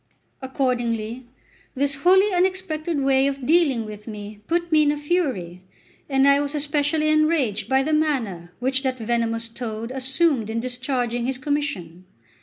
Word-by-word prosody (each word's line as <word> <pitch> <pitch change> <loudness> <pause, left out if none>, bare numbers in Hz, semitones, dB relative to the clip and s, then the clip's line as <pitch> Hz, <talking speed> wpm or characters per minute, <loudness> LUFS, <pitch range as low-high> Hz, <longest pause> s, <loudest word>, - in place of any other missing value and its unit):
Accordingly, 245 -3 -2 0.5
this 280 +1 +2
wholly 380 +6 +4
unexpected 355 -4 0
way 270 0 +3
of 275 -2 -3
dealing 290 -7 +3
with 210 0 -10
me 210 -1 -8
put 345 0 -1
me 310 -1 +5
in 295 -1 +3
a 295 - -2
fury, 270 - -2 0.5
and 270 0 +3
I 280 0 +5
was 290 +1 -2
especially 295 +1 +1
enraged 310 -9 +1
by 265 0 +3
the 310 +2 -1
manner 230 - -1
which 260 +2 +1
that 260 -2 -2
venomous 230 0 -1
toad 230 0 -6
assumed 265 -2 +1
in 225 +1 -2
discharging 245 -1 -2
his 265 -1 -1
commission. 280 - -3
265 Hz, 150 wpm, -23 LUFS, 230-300 Hz, 0.5 s, me